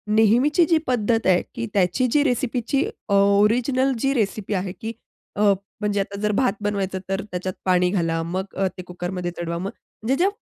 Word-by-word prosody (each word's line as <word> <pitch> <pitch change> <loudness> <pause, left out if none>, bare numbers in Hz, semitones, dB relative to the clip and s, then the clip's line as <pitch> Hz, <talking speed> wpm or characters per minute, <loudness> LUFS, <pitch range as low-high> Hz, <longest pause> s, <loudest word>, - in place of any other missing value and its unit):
नेहमीची 250 - +4
जी 325 - +5
पद्धत 230 -2 +1
आहे 180 -1 +4
की 230 - -2
त्याची 200 +7 +2
जी 295 -1 +4
रेसिपीची 260 0 0 0.3
अ, 200 - +1
ओरिजिनल 225 +7 +3
जी 270 +3 +1
रेसिपी 210 -3 -1
आहे, 185 -1 -1
की 225 +3 -6 0.4
अ, 205 - -1 0.4
म्हणजे 205 -1 0
आता 200 0 -3
जर 210 - +1
भात 250 +5 +2
बनवायचा 195 -2 -1
तर 195 0 0
त्याच्यात 185 +1 -3
पाणी 180 -1 +3
घाला, 165 -4 0
मग 185 +4 -4
अ, 195 0 +1
ते 185 - -5
कुकरमध्ये 180 0 -4
चढवा. 170 0 -3
मग 190 +3 -3 0.3
म्हणजे 255 +5 +1
ज्या 390 - +4
205 Hz, 185 wpm, -23 LUFS, 185-245 Hz, 0.4 s, जी